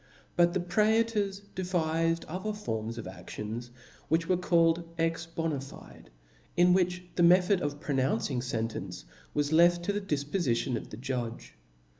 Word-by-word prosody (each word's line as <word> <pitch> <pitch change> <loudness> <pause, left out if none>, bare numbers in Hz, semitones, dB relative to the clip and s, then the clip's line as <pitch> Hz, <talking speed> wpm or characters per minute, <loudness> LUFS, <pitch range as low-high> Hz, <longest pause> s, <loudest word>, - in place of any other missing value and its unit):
Butthtpr^lors 200 +4 +2
devifed 165 -2 0
other 190 +6 -3
forms 115 - -4
of 115 - -6
aftions, 105 +6 -6 0.4
which 165 +1 +2
were 185 - +3
called 170 -1 +3
ex 165 0 0
bona 165 -2 -2
fide^ 135 - -12 0.5
where 180 +1 +5 0.3
the - - +1
method 180 +2 +5
of 145 0 -2
pronouncing 135 -3 0
fen 115 -3 -1
tcnce 95 - -7 0.3
was 145 +1 +1
left 175 +1 +5
to 205 - 0
the 205 - -1
difpofition 140 -7 0
of - - -5
the 105 - -8
judge. 120 -2 -4
165 Hz, 135 wpm, -30 LUFS, 130-180 Hz, 0.5 s, where